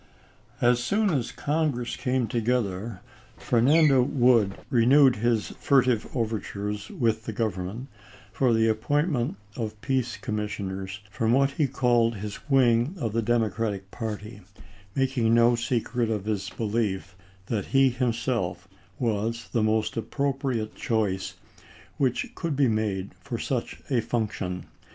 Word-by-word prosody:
As 120 Hz, 0 st, +3 dB
soon 205 Hz, -, +2 dB
as 130 Hz, -7 st, -1 dB
Congress 145 Hz, -5 st, -1 dB
came 125 Hz, -1 st, 0 dB
together 110 Hz, -3 st, -1 dB, 0.4 s
Fernando 135 Hz, +3 st, +4 dB
Wood 125 Hz, -6 st, +3 dB, 0.2 s
renewed 130 Hz, +2 st, +5 dB
his 115 Hz, 0 st, +1 dB
furtive 130 Hz, -5 st, +3 dB
overtures 105 Hz, -3 st, -3 dB
with 110 Hz, -2 st, 0 dB
the -, -, -3 dB
Government 105 Hz, +2 st, -3 dB, 0.5 s
for 130 Hz, -3 st, +2 dB
the 115 Hz, 0 st, +3 dB
appointment 125 Hz, -, 0 dB, 0.2 s
of 110 Hz, -3 st, -4 dB
peace 130 Hz, -2 st, -1 dB
com 110 Hz, -3 st, -3 dB
missioners 100 Hz, -2 st, -4 dB
from 110 Hz, +2 st, +1 dB
what 135 Hz, +1 st, +3 dB
he 145 Hz, +1 st, +1 dB
called 120 Hz, -3 st, +2 dB
his 105 Hz, +7 st, -7 dB
wing 130 Hz, +3 st, +3 dB
of 115 Hz, -7 st, -2 dB
the 115 Hz, -, +1 dB
Democratic 110 Hz, -3 st, -1 dB
party, 105 Hz, -1 st, -6 dB, 0.5 s
making 130 Hz, -4 st, +2 dB
no 120 Hz, +1 st, +5 dB
secret 120 Hz, 0 st, -1 dB
of 105 Hz, -3 st, -2 dB
his 100 Hz, -2 st, -2 dB
belief 105 Hz, -4 st, -2 dB, 0.3 s
that 105 Hz, -2 st, -2 dB
he 135 Hz, -1 st, +4 dB
himself 115 Hz, -7 st, -1 dB, 0.3 s
was 115 Hz, 0 st, -1 dB
the 115 Hz, -, +1 dB
most 110 Hz, 0 st, +1 dB
appropriate 135 Hz, -2 st, -2 dB
choice 110 Hz, -7 st, -1 dB, 0.6 s
which 130 Hz, -3 st, 0 dB
could 165 Hz, -5 st, -3 dB
be 135 Hz, -1 st, +3 dB
made 105 Hz, -4 st, -1 dB
for -, -, -4 dB
such -, -, -3 dB
a 125 Hz, -3 st, +3 dB
function. 95 Hz, -7 st, -3 dB
115 Hz, 130 wpm, -26 LUFS, 105-130 Hz, 0.6 s, renewed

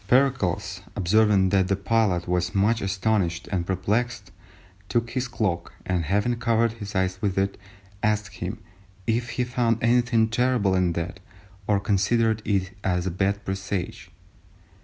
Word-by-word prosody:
Pericles 100 Hz, -7 st, +1 dB
observing 100 Hz, 0 st, +3 dB
that 95 Hz, -1 st, +3 dB
the 100 Hz, -, +2 dB
pilot 100 Hz, -3 st, +1 dB
was 90 Hz, 0 st, 0 dB
much 110 Hz, +4 st, +2 dB
astonished 95 Hz, -3 st, 0 dB
and 90 Hz, -3 st, -1 dB
perplexed, 105 Hz, +2 st, -1 dB, 0.6 s
took 115 Hz, -1 st, 0 dB
his 130 Hz, +1 st, -1 dB
cloak, 105 Hz, -8 st, -2 dB
and 90 Hz, -3 st, 0 dB
having 105 Hz, +7 st, +1 dB
covered 115 Hz, -1 st, +2 dB
his 105 Hz, -2 st, -8 dB
eyes 95 Hz, +1 st, 0 dB
with 100 Hz, -3 st, -1 dB
it, 95 Hz, 0 st, +1 dB, 0.5 s
asked 105 Hz, -2 st, 0 dB
him 95 Hz, +5 st, -4 dB, 0.5 s
if 120 Hz, +1 st, 0 dB
he 125 Hz, -, +2 dB
found 120 Hz, -2 st, +1 dB
anything 120 Hz, -1 st, +3 dB
terrible 115 Hz, -3 st, +1 dB
in 90 Hz, -2 st, +2 dB
that, 85 Hz, +3 st, -4 dB, 0.5 s
or 105 Hz, -2 st, +3 dB
considered 110 Hz, +3 st, +1 dB
it 95 Hz, -2 st, 0 dB
as 90 Hz, -1 st, 0 dB
a 95 Hz, -, -1 dB
bad 100 Hz, +3 st, -1 dB
presage? 95 Hz, -1 st, -4 dB
100 Hz, 145 wpm, -25 LUFS, 95-115 Hz, 0.6 s, observing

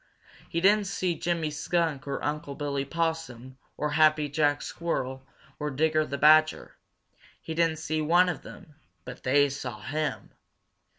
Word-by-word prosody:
He 170 Hz, -, -1 dB
didn't 205 Hz, +2 st, +4 dB
see 185 Hz, -2 st, -1 dB
Jimmy 165 Hz, -2 st, -2 dB
Skunk 155 Hz, -2 st, -1 dB
or 140 Hz, -, -3 dB
Unc' 145 Hz, -1 st, -3 dB
Billy 140 Hz, -2 st, -2 dB
Possum 140 Hz, -5 st, -3 dB, 0.2 s
or 150 Hz, 0 st, -1 dB
Happy 155 Hz, -1 st, +3 dB
Jack 145 Hz, 0 st, +1 dB
Squirrel 130 Hz, -6 st, -3 dB, 0.4 s
or 150 Hz, 0 st, -2 dB
Digger 155 Hz, +2 st, +1 dB
the 140 Hz, -, -4 dB
Badger. 155 Hz, +1 st, +4 dB, 0.6 s
He 160 Hz, -, -6 dB
didn't 165 Hz, -1 st, +1 dB
see 155 Hz, 0 st, -2 dB
one 175 Hz, +4 st, +4 dB
of 175 Hz, -6 st, -3 dB
them, 155 Hz, -, -13 dB, 0.3 s
but -, -, -9 dB
they 145 Hz, +2 st, +3 dB
saw 130 Hz, -5 st, -6 dB
him. 150 Hz, +6 st, -3 dB
155 Hz, 150 wpm, -27 LUFS, 140-165 Hz, 0.6 s, didn't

